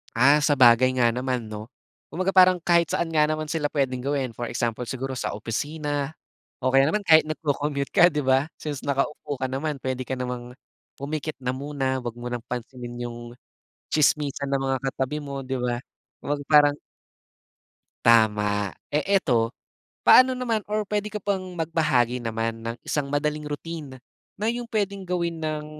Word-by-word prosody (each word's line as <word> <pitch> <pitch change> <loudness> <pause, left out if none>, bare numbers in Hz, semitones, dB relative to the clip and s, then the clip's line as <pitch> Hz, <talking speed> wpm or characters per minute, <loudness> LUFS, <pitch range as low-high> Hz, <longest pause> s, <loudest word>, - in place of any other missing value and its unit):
Ah, 140 +5 +5
sabagay 130 -3 +5
nga 120 - +5
naman, 125 -2 -2
'no? 110 +2 -8 0.4
Kumbaga 185 +3 -1
parang 185 -1 +7
kahit 170 -1 +2
saan 170 - 0
nga 150 - +5
naman 155 0 -1
sila 150 -2 -1
puwedeng 130 -3 -1
gawin. 135 -5 -2
For 120 - -5
example 120 0 -2
siguro 130 +2 -4
sa - - -3
opisina 145 +6 -3 0.5
o 130 - -1
kaya 135 +1 +5
naman 190 +7 0
kahit 160 -1 +7
nagco-commute 145 -2 -2
ka, 175 -1 +7
'di 150 - -1
ba, 135 +2 +2
since 145 -3 -5
nakaupo 140 0 -2
ka 130 - -1
naman, 140 +2 -3
puwede 130 0 -3
ka 130 +1 -4
namang 125 -1 -4 0.5
pumikit 155 +2 -4
na 125 -1 -2
muna. 135 -2 -2
Huwag 120 -1 -5
mo 120 - -5
ng 120 -1 -4
pansinin 120 0 -6
yung 120 0 -8 0.7
tsismisan 145 -2 +1
ng 140 - +2
mga 135 0 +1
katabi 135 +2 -3
mo, 140 -2 -6
'di 130 -1 -3
ba? 120 -1 0 0.5
Huwag 145 0 -1
parang 145 -1 +6 1.3
Tama. 105 -3 +3 0.2
Eh, 150 +1 0 0.2
eto, 115 -3 +1 0.5
paano 255 0 +7
naman 230 -4 -1
or 215 0 0
puwede 210 +1 -2
ka 210 - -4
bang 195 -1 -1 0.2
magbahagi 140 -7 +1
naman 115 0 -3
ng 115 +1 -4
isang 140 -2 -1
madaling 150 +1 -1
routine, 150 -2 -6 0.4
na 215 - -1
yung 240 0 -4
puwedeng 200 -2 -1
gawin 170 -2 -1
ng 155 -1 -3
140 Hz, 165 wpm, -25 LUFS, 125-155 Hz, 1.3 s, parang